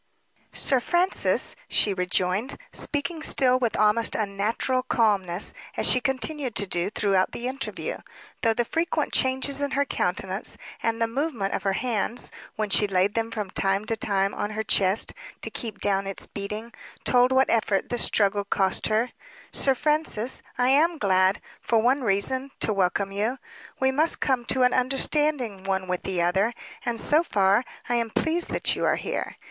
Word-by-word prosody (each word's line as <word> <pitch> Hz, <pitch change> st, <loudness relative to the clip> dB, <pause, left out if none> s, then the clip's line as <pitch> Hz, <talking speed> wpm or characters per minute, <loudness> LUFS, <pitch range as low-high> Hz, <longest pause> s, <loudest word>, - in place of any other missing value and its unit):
"Sir 265 Hz, -, +3 dB
Francis," 350 Hz, +8 st, +1 dB
she 205 Hz, -, +2 dB
rejoined, 185 Hz, +5 st, 0 dB, 0.2 s
speaking 310 Hz, +3 st, -2 dB
still 255 Hz, -4 st, +3 dB
with 240 Hz, -3 st, 0 dB
almost 215 Hz, +2 st, +3 dB
unnatural 215 Hz, +5 st, 0 dB
calmness, 205 Hz, -7 st, 0 dB, 0.2 s
as -, -, +2 dB
she 255 Hz, -, +5 dB
continued 265 Hz, -1 st, -2 dB
to 200 Hz, -, +1 dB
do 180 Hz, 0 st, -1 dB
throughout 195 Hz, -3 st, +1 dB
the 240 Hz, -, -4 dB
interview 265 Hz, +1 st, -4 dB, 0.4 s
though 225 Hz, -1 st, +2 dB
the 240 Hz, -, +1 dB
frequent 325 Hz, +1 st, -1 dB
changes 265 Hz, +2 st, +1 dB
in 285 Hz, -, 0 dB
her 280 Hz, -, +3 dB
countenance, 190 Hz, -3 st, -1 dB, 0.2 s
and 230 Hz, 0 st, -1 dB
the 230 Hz, -, +3 dB
movement 235 Hz, -5 st, -2 dB
of -, -, -1 dB
her 195 Hz, -1 st, 0 dB
hands, 235 Hz, +1 st, -1 dB, 0.2 s
when 215 Hz, -1 st, -1 dB
she 210 Hz, -, +4 dB
laid 195 Hz, +1 st, +2 dB
them 225 Hz, 0 st, -1 dB
from 210 Hz, -4 st, -4 dB
time 195 Hz, +2 st, 0 dB
to 225 Hz, -, 0 dB
time 195 Hz, -2 st, 0 dB
on 205 Hz, -, -3 dB
her 215 Hz, +1 st, -3 dB
chest 195 Hz, 0 st, +2 dB, 0.3 s
to -, -, -4 dB
keep 220 Hz, -4 st, -6 dB
down 195 Hz, -1 st, 0 dB
its 195 Hz, -, -4 dB
beating, 210 Hz, +3 st, -6 dB, 0.3 s
told 250 Hz, 0 st, +4 dB
what 260 Hz, 0 st, +3 dB
effort 215 Hz, -4 st, +1 dB
the 245 Hz, -, -1 dB
struggle 205 Hz, -2 st, +2 dB
cost 195 Hz, -1 st, +1 dB
her 220 Hz, +3 st, +1 dB, 0.4 s
"Sir 270 Hz, -1 st, +3 dB
Francis, 295 Hz, -5 st, 0 dB, 0.2 s
I 250 Hz, +1 st, +3 dB
am 320 Hz, +5 st, +4 dB
glad, 190 Hz, -3 st, +3 dB, 0.2 s
for 230 Hz, -, +1 dB
one 250 Hz, +5 st, +3 dB
reason, 255 Hz, +5 st, 0 dB
to 215 Hz, -, +2 dB
welcome 195 Hz, 0 st, 0 dB
you; 215 Hz, +6 st, -1 dB, 0.4 s
we 265 Hz, 0 st, +3 dB
must 310 Hz, +5 st, +2 dB
come 255 Hz, -4 st, 0 dB
to 255 Hz, +1 st, +1 dB
an 250 Hz, -, +4 dB
understanding 260 Hz, -4 st, 0 dB
one 190 Hz, -1 st, -1 dB
with 180 Hz, -1 st, -2 dB
the 180 Hz, -3 st, -1 dB
other; 195 Hz, +7 st, +1 dB, 0.3 s
and, 235 Hz, -1 st, -1 dB
so 300 Hz, +7 st, +4 dB
far, 200 Hz, -, +2 dB, 0.2 s
I 240 Hz, -, +1 dB
am 230 Hz, -1 st, -1 dB
pleased 325 Hz, +9 st, -1 dB
that -, -, 0 dB
you -, -, -3 dB
are -, -, +3 dB
here. -, -, -4 dB
225 Hz, 175 wpm, -25 LUFS, 195-260 Hz, 0.4 s, she